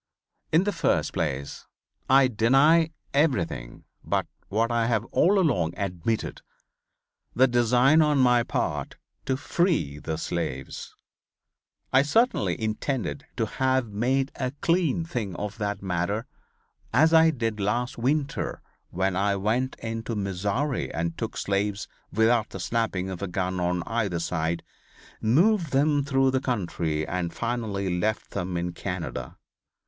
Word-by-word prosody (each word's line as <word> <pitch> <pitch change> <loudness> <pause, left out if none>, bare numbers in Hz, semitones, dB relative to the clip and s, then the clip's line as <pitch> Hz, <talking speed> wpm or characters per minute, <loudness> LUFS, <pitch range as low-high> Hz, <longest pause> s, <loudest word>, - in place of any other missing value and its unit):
In 160 +4 +4
the 205 - 0
first - - 0
place 70 +1 -3 0.4
I 135 0 +6
deny 135 +8 +4 0.2
everything 130 - 0 0.2
but - - 0 0.2
what 115 +3 +1
I 115 -1 +1
have 115 -2 +1
all 200 +3 +4
along 135 - +1
admitted, 100 +2 -2 0.9
the 130 +2 +5
design 125 +5 +4
on 150 -2 +3
my 125 -2 +5
part - - -2 0.3
to 130 - +1
free 150 - 0
the 80 +1 -4
slaves. 80 -6 -4 1.0
I 130 - +7
certainly 145 - +2
intended 130 +6 -2
to 115 - +1
have 130 0 0
made 130 +6 0
a 130 -2 -1
clean 170 -2 +1
thing 110 - -4
of 105 +4 -5
that 100 -1 -2
matter 95 +5 -1 0.7
as 160 +7 +4
I 160 0 +7
did 115 -7 -2
last 120 +5 -1
winter 140 +3 -1 0.3
when 95 +1 -1
I 100 +1 +1
went 115 +7 0
into 115 0 -3
Missouri 100 +8 -1
and 85 +2 -2
took - - -4
slaves 100 +1 -1 0.2
without 110 +1 +3
the 95 - -7
snapping 95 0 -1
of 95 - -6
a 100 - -2
gun 90 0 -2
on 90 0 0
either 105 -5 -1
side, 85 0 -1 0.6
moved 165 - +3
them 145 +1 +3
through 135 -1 +2
the 130 0 0
country 85 - -1
and 85 -1 -2
finally 100 -6 -2
left 110 +3 -1
them 90 -2 -3
in 85 0 -2
Canada. 90 -1 -5
115 Hz, 135 wpm, -26 LUFS, 95-135 Hz, 1.0 s, I